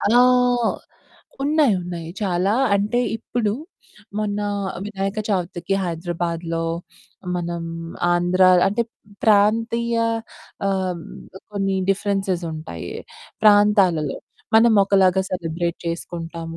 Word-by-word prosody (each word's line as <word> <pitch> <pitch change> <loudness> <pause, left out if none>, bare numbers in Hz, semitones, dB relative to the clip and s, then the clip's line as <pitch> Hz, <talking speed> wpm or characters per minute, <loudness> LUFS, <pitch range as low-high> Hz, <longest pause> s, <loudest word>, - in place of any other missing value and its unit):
ఆ! - - +1 1.3
ఉన్నాయి 290 -6 +3
ఉన్నాయి, 170 -2 -6
చాలా 190 +2 +1 0.2
అంటే 210 +4 +1 0.2
ఇప్పుడు 225 -2 -2 0.7
మొన్న 210 -1 -1 0.4
వినాయక 195 0 -3
చవితికి 180 -1 -1
హైదరాబాద్‌లో, 170 -1 -3 0.7
మనం 170 -1 -3 0.5
ఆంధ్ర 175 +2 +2 0.2
అంటే 215 +4 +1 0.4
ప్రాంతీయ 230 +3 +3 0.7
ఆహ్, 185 -3 -1 0.5
కొన్ని 195 -1 0
డిఫరెన్సె‌సుంటాయి 180 - -2 0.5
ప్రాంతాలలో. 205 -8 +4 0.4
మనం 230 +1 +6
ఒకలాగా 190 -1 +4
సెలబ్రేట్ 170 -1 -2
చేసుకుంటాము, 165 -1 -5
190 Hz, 80 wpm, -22 LUFS, 170-205 Hz, 1.3 s, మనం